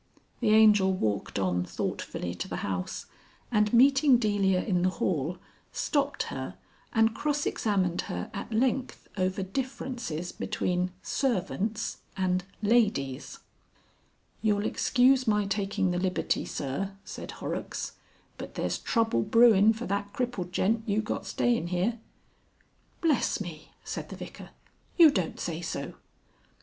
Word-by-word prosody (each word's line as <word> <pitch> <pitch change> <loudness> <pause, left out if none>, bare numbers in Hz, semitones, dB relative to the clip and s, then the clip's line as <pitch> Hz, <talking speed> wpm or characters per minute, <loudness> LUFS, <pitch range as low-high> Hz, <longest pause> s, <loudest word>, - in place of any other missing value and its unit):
The 235 - +1
Angel 210 -3 +6
walked 110 - -1
on 90 -2 +1
thoughtfully 90 -1 -4
to 90 - -5
the - - -4
house, 90 -2 -3 0.5
and 210 -2 +3
meeting 270 +2 +6
Delia 200 -5 +2
in 180 -4 +1
the 185 - +3
hall 175 -2 -1 0.3
stopped 285 -2 0
her - - -5 0.4
and 225 -1 +3
cross 295 +3 -1
examined 190 -5 0
her 90 0 -4
at - - -6
length 255 +3 0
over 185 0 0
differences 235 - -4
between 180 0 -1
Servants 220 -3 -1 0.2
and 185 -1 +1 0.2
Ladies. 205 - +1 1.0
"You'll 210 -1 +1
excuse 255 +1 +3
my 210 -1 +3
taking 195 -1 0
the 175 - 0
liberty, 185 0 0
Sir," 150 +9 -3
said - - -7
Horrocks, - - -4 0.5
"but - - -8
there's - - -1
trouble 225 - +1
brewin' 220 - +6
for 225 +2 -4
that 200 0 -2
crippled 240 -8 -2
gent 220 +5 +1
you 210 +2 +1
got 195 -2 -3
stayin' 235 -2 +1
here." 185 +7 0 1.0
"Bless 315 -7 +2
me!" 165 -6 -7
said - - -5
the - - -7
Vicar. - - -9 0.5
"You 330 -4 +9
don't 185 - -2
say 170 -1 -3
so!" 170 - -4
205 Hz, 130 wpm, -28 LUFS, 180-235 Hz, 1.0 s, You